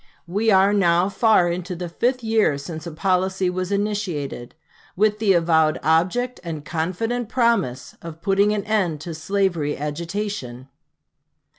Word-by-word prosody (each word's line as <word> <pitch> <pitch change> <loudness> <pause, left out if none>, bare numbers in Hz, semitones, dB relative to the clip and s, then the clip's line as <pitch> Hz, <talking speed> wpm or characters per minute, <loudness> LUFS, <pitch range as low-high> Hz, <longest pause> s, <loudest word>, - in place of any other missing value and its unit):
We 205 +6 0
are 195 0 +5
now 180 -2 +3
far 195 -4 +3
into 180 +1 -4
the 175 +1 -5
fifth 245 +8 -1
year 220 -9 +2
since 155 +3 -7
a - - -5
policy 185 +2 0
was 185 +1 -3
initiated, 200 - -3 0.4
with 210 +2 +2
the 210 -3 +3
avowed 160 -3 +2
object 185 +11 +1
and 160 -4 -6
confident 205 +9 -2
promise 195 - 0
of 165 -1 -9
putting 200 +2 +2
an 210 -1 -1
end 190 -8 0
to 165 +1 -6
slavery 170 -2 -1
agitation. 150 -4 -5
185 Hz, 140 wpm, -22 LUFS, 160-210 Hz, 0.4 s, are